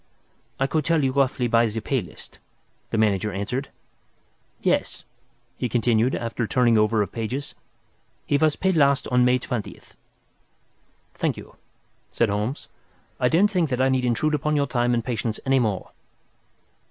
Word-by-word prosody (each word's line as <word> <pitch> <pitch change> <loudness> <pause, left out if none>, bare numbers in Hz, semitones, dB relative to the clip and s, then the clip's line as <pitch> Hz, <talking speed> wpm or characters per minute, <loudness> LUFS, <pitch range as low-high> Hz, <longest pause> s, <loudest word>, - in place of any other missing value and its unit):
"I 135 - +2
could 155 +2 0
tell 165 -1 +2
you 135 - +2
roughly 130 -2 +1
by 115 0 +3
the 110 +1 -3
pay 130 +3 -1
list," 90 - -12 0.5
the - - -2
manager 105 -1 +1
answered. 105 +8 -3 0.9
"Yes," - - -1 0.5
he 125 - -1
continued, 120 +1 +2
after 115 0 -3
some - - -6
turning 120 -1 +3
over 105 0 +3
of - - -7
pages, 125 +6 -4 0.7
"he - - +1
was 155 0 +2
paid 190 -1 0
last 140 -3 +3
on 125 0 +3
May 125 +1 +4
20th." 120 -3 -6 1.2
"Thank - - -1
you," - - -12 0.6
said 115 - +1
Holmes. 105 +7 -3 0.5
"I 125 - +3
don't 195 +8 +3
think 175 -6 +1
that 125 -1 -1
I 130 0 +3
need 130 -1 +1
intrude 125 +6 +1
upon 150 +1 0
your 145 -1 +2
time 120 -2 +1
and 115 -1 -2
patience 115 -2 -2
any 135 0 +3
more." 105 -6 -2
125 Hz, 165 wpm, -24 LUFS, 115-140 Hz, 1.2 s, May